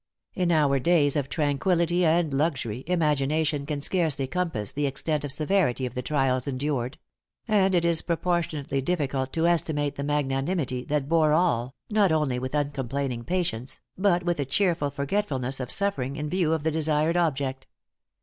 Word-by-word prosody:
In 180 Hz, -2 st, 0 dB
our 145 Hz, -4 st, +3 dB
days 145 Hz, -1 st, +3 dB
of 140 Hz, -2 st, -1 dB
tranquillity 170 Hz, +4 st, +1 dB
and 160 Hz, -2 st, +2 dB
luxury, 135 Hz, -5 st, -1 dB
imagination 150 Hz, -3 st, +1 dB
can 150 Hz, -2 st, -3 dB
scarcely 155 Hz, -5 st, 0 dB
compass 150 Hz, -, -2 dB
the 145 Hz, 0 st, 0 dB
extent 145 Hz, +2 st, -1 dB
or 145 Hz, -, -3 dB
severity 150 Hz, -3 st, +1 dB
of 125 Hz, -, -5 dB
the 125 Hz, -, -3 dB
trials 130 Hz, -1 st, 0 dB
endured; 135 Hz, -1 st, -2 dB, 0.5 s
and 195 Hz, -4 st, +3 dB
it 170 Hz, -1 st, +2 dB
is 170 Hz, -1 st, +2 dB
proportionately 165 Hz, -5 st, -1 dB
difficult 135 Hz, -4 st, -1 dB
to 165 Hz, 0 st, +1 dB
estimate 150 Hz, -4 st, +1 dB
the 140 Hz, -, -3 dB
magnanimity 140 Hz, -1 st, -1 dB
that 145 Hz, -2 st, -1 dB
bore 155 Hz, -1 st, +3 dB
all, 135 Hz, -7 st, +1 dB
not 210 Hz, -4 st, +3 dB
only 150 Hz, -5 st, +1 dB
with 130 Hz, +3 st, -4 dB
uncomplaining 140 Hz, -3 st, -2 dB
patience, 165 Hz, -9 st, -1 dB, 0.2 s
but 180 Hz, -2 st, +2 dB
with 175 Hz, -2 st, -1 dB
a -, -, +2 dB
cheerful 165 Hz, 0 st, +1 dB
forgetfulness 140 Hz, -3 st, -2 dB
of 125 Hz, -2 st, -4 dB
suffering 170 Hz, -10 st, 0 dB
in 150 Hz, +1 st, -4 dB
view 175 Hz, -4 st, +1 dB
of 160 Hz, -2 st, 0 dB
the 160 Hz, -, +1 dB
desired 155 Hz, +1 st, +1 dB
object. 135 Hz, -6 st, -1 dB
150 Hz, 160 wpm, -26 LUFS, 135-170 Hz, 0.5 s, our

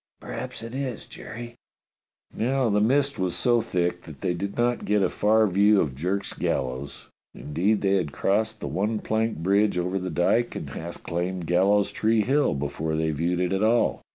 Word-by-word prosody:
"Perhaps -, -, -6 dB
it 115 Hz, +1 st, -7 dB
is, 130 Hz, -3 st, -4 dB
Jerry." 120 Hz, 0 st, -9 dB, 0.8 s
Now 130 Hz, +1 st, +1 dB
the 105 Hz, 0 st, +3 dB
mist 140 Hz, +4 st, +2 dB
was 90 Hz, -2 st, 0 dB
so 120 Hz, -1 st, +3 dB
thick 90 Hz, -3 st, -1 dB
that 75 Hz, -5 st, -12 dB
they 90 Hz, -, 0 dB
did 100 Hz, +3 st, -4 dB
not 120 Hz, 0 st, +1 dB
get 105 Hz, 0 st, +2 dB
a -, -, +1 dB
far 110 Hz, +1 st, +3 dB
view 100 Hz, +2 st, +4 dB
of 70 Hz, -, 0 dB
Jerk's 95 Hz, +8 st, -2 dB
gallows; 65 Hz, +2 st, -3 dB, 0.3 s
indeed 95 Hz, +8 st, 0 dB
they 100 Hz, 0 st, +3 dB
had 80 Hz, -6 st, -2 dB
crossed 110 Hz, +5 st, 0 dB
the -, -, -3 dB
one 105 Hz, +3 st, -1 dB
planked 110 Hz, -5 st, -1 dB
bridge 100 Hz, +1 st, +3 dB
over 90 Hz, +2 st, -1 dB
the 90 Hz, 0 st, -4 dB
dyke 90 Hz, +8 st, +1 dB
and -, -, -6 dB
half 85 Hz, +1 st, -7 dB
climbed 90 Hz, +1 st, -3 dB
Gallows 95 Hz, +4 st, +3 dB
Tree 110 Hz, 0 st, +2 dB
Hill 140 Hz, -, +2 dB
before 75 Hz, +3 st, -2 dB
they 80 Hz, 0 st, 0 dB
viewed 85 Hz, +4 st, -1 dB
it 90 Hz, +1 st, 0 dB
at 95 Hz, -, 0 dB
all. 115 Hz, +2 st, +2 dB
100 Hz, 185 wpm, -25 LUFS, 85-110 Hz, 0.8 s, view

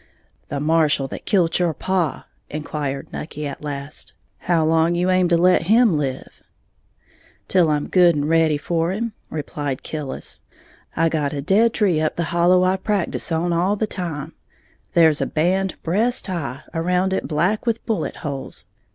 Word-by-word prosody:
"The 140 Hz, -, -3 dB
marshal 150 Hz, -2 st, +2 dB
that -, -, -8 dB
kilt 175 Hz, -4 st, +2 dB
your 170 Hz, -3 st, +1 dB
paw," 185 Hz, -5 st, -1 dB, 0.2 s
inquired 145 Hz, -2 st, -4 dB
Nucky, 150 Hz, -1 st, -5 dB
at 140 Hz, -, -6 dB
last, 140 Hz, 0 st, -6 dB, 0.3 s
"how 170 Hz, -3 st, +1 dB
long 165 Hz, +2 st, +3 dB
you 180 Hz, +2 st, +1 dB
aim 185 Hz, -1 st, +3 dB
to 170 Hz, -1 st, +3 dB
let 180 Hz, -1 st, +3 dB
him 225 Hz, -3 st, +5 dB
live?" 135 Hz, -3 st, -4 dB, 1.1 s
"Till 180 Hz, -4 st, +3 dB
I'm 150 Hz, -1 st, 0 dB
good 175 Hz, -3 st, +5 dB
and 145 Hz, 0 st, -1 dB
ready 160 Hz, -2 st, +3 dB
for 165 Hz, +3 st, -1 dB
him," 225 Hz, +3 st, -3 dB, 0.2 s
replied 145 Hz, -3 st, -4 dB
Killis; 150 Hz, -4 st, -6 dB, 0.6 s
"I 165 Hz, +1 st, +3 dB
got 150 Hz, -3 st, -1 dB
a 140 Hz, -, -3 dB
dead 220 Hz, +8 st, +3 dB
tree 180 Hz, -7 st, +2 dB
up 155 Hz, -, 0 dB
the 170 Hz, -, -1 dB
hollow 180 Hz, +1 st, +4 dB
I 185 Hz, +1 st, +2 dB
practice 195 Hz, -3 st, -1 dB
on 170 Hz, +2 st, 0 dB
all 180 Hz, +5 st, +2 dB
the 220 Hz, -, 0 dB
time, 165 Hz, -7 st, -5 dB, 0.6 s
there's 160 Hz, -3 st, +5 dB
a -, -, 0 dB
band 185 Hz, +4 st, 0 dB
breast 225 Hz, +9 st, 0 dB
high 165 Hz, -8 st, -4 dB
around 180 Hz, +3 st, +1 dB
it -, -, -2 dB
black 180 Hz, +9 st, 0 dB
with 230 Hz, -1 st, -1 dB
bullet 220 Hz, -, -2 dB
holes. 140 Hz, -2 st, -6 dB
165 Hz, 165 wpm, -21 LUFS, 150-185 Hz, 1.1 s, him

